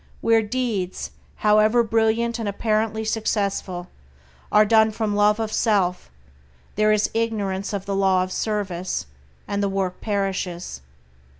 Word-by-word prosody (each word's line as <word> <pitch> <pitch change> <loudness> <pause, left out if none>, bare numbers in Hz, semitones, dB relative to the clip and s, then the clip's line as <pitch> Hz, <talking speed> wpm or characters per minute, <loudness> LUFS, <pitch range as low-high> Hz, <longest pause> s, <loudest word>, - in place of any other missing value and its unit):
Where 225 0 +4
deeds, 215 -5 -3 0.2
however 215 +3 +4
brilliant 225 +1 +1
and 220 -3 -2
apparently 220 +1 -1
successful, 200 -5 -2 0.6
are 210 0 +6
done 220 +1 +5
from 215 -1 -2
love 210 +1 +3
of 220 -1 -2
self, 195 -5 +1 0.6
there 215 +1 +3
is 215 -1 +2
ignorance 205 -4 -1
of 200 -2 -4
the 200 -1 -2
Law 190 -1 +3
of 185 - -6
Service, 190 -4 -2 0.4
and 200 0 -1
the 200 - +1
work 190 -2 -2
perishes. 190 - -3
210 Hz, 130 wpm, -23 LUFS, 195-220 Hz, 0.6 s, are